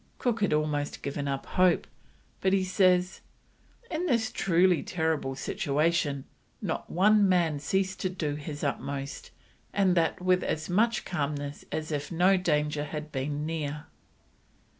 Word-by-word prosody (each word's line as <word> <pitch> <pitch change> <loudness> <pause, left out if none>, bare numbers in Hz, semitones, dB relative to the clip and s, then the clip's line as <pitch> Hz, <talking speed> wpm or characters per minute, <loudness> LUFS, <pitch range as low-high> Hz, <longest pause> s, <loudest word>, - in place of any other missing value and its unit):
Cook 235 -3 -1
had 205 - +2
almost 150 -1 -1
given 140 0 -3
up 135 -1 -2
hope, 180 -2 +3 0.5
but 190 0 +2
he 195 -1 +3
says: 185 -1 +2 0.7
"In 345 +2 -1
this 230 -6 +1
truly 180 -2 +3
terrible 160 -6 -1
situation, 145 0 0 0.3
not - - -3
one 205 +2 +4
man 170 -5 +2
ceased 190 +6 -1
to 185 - -1
do 165 -5 -2
his 145 0 -6
utmost, 140 0 -3 0.4
and 195 -2 +3
that 165 -2 +1
with 180 0 +2
as 155 - -2
much 225 +5 +2
calmness 145 -3 -3
as 155 0 -3
if 145 +1 -3
no 180 +3 +4
danger 150 -4 0
had 150 0 -6
been 145 +2 -2
near." 150 -2 -3
160 Hz, 140 wpm, -28 LUFS, 145-185 Hz, 0.7 s, one